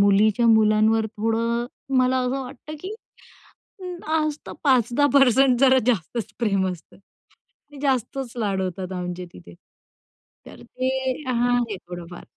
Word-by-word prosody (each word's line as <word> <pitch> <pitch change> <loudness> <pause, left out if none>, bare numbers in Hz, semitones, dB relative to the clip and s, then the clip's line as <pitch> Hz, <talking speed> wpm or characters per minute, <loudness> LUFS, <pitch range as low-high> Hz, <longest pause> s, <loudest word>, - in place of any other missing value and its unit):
मुलीच्या 205 +3 +4
मुलांवर 220 0 +4
थोडं 225 +2 -1 0.3
मला 255 0 +3
असं 260 +2 -1
वाटतं 275 +4 -9
की 380 +5 -6 0.9
अ, 370 - -9 0.3
आज 305 -2 +1
तर - - -7
5-10% 265 0 +4
जरा 260 -1 +6
जास्तचं 230 -1 -1
प्रेम 195 -5 +1
असतं. 170 -2 -14 0.8
ते 285 - -11
जास्तचं 260 -2 -2
लाड 195 -3 0
होतात 185 0 -4
आमचे 180 0 -5
तिथे. 85 -1 -13 0.9
तर - - -13
ते 255 0 -4 0.4
हां, 245 0 +2
आहे 230 -4 -2
थोडंफार. 175 -1 -10
235 Hz, 125 wpm, -23 LUFS, 200-260 Hz, 0.9 s, जरा